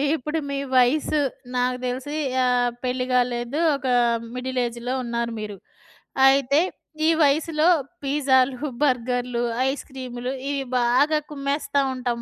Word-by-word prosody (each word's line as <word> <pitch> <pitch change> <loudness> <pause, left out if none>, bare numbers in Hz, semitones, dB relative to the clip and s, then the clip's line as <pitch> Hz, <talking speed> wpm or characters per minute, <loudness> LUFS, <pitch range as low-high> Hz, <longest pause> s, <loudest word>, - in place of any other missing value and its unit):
ఇప్పుడు 305 +3 -3
మీ 280 - -2 0.2
వయసు 270 +4 +3 0.4
నాకు 250 0 +1
దెలిసి 260 +4 -3 0.3
ఆహ్, 245 -1 +2
పెళ్లి 255 0 -1
గాలేదు, 245 +3 0 0.2
ఒక 275 -1 -5 0.5
మిడిలేజ్‌లో 250 -1 -2
ఉన్నారు 235 -1 -2
మీరు. 210 -2 -6 0.7
అయితే 275 +2 +4 0.5
ఈ - - +5
వయసులో 305 +3 +2 0.4
పిజ్జాలు, 270 -1 +2
బర్గర్‌లు, 245 -2 0 0.3
ఐస్ 275 - -4
క్రీమ్‌లు 255 -1 -5 0.2
ఇవి 280 -1 -1 0.2
బాగా 270 +6 +3
కుమ్మేస్తా 280 0 -1
ఉంటాం. 245 -2 -3
255 Hz, 115 wpm, -23 LUFS, 245-280 Hz, 0.7 s, ఈ